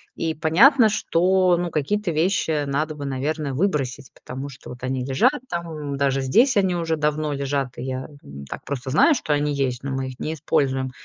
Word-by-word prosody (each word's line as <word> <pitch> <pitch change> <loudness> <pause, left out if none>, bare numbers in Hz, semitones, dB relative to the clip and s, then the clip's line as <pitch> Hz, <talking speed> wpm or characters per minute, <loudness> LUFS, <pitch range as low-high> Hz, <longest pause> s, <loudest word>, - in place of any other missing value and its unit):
И 165 -1 -2
понятно, 215 - +5
что 185 -2 +2
ну 175 0 -2
какие-то 175 +7 -1
вещи 160 -2 +1
надо 150 +3 -2
бы, 145 -1 -6
наверное, 140 +1 -2
выбросить. 135 -6 -1
Потому 135 +3 -7
что 135 - -11
вот 125 - -9
они 130 0 -2
лежат 135 - +3 0.2
там, 160 - -4
даже 135 -1 +1
здесь 235 - +3
они 190 -2 +2
уже 165 -2 -1
давно 150 0 0
лежат, 140 -2 -2
и - - -5
я 130 0 -4 0.2
н 70 0 -10
так - - -7
просто 135 -2 -4
знаю, 155 - +5
что 155 - -1
они 145 0 0
есть, 130 -3 -2
но 140 - -3
мы 135 0 -2
их 130 - -9
не 155 - -3
используем. 135 -3 0
150 Hz, 195 wpm, -23 LUFS, 135-170 Hz, 0.2 s, понятно